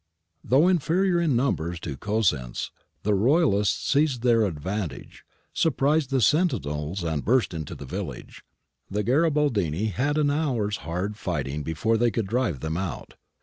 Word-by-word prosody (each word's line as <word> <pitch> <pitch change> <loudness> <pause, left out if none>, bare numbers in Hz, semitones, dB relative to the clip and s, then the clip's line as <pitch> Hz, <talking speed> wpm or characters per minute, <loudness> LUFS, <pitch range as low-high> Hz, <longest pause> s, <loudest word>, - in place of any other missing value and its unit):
^ - - -15
Though 140 +7 +5
inferior 175 +1 +2
in 155 -7 +2
numbers 90 -10 0
to 75 -5 -5
Cosenz, 90 - -1 0.3
the 105 - +2
Royalists 110 - +2
seized 140 -4 +2
their 115 -3 +4
advantage, 90 +3 -5 0.3
surprised 150 -1 +1
the 135 -2 +1
sentinels 95 - +1
and 80 -4 -2
burst 120 -3 +2
into 80 -3 -5
the 70 - -9
village. - - -7 0.5
The 105 +1 -1
Garibaldini 120 - +1
had 145 - 0
an 145 -2 +2
hour's 125 -9 0
hard 90 +7 -4
fighting 75 -7 -3
before 85 +10 0
they 120 +1 +3
could 115 -2 -2
drive 110 - -1
them 80 +1 -2
out. 95 -4 -5
110 Hz, 145 wpm, -25 LUFS, 85-140 Hz, 0.5 s, Though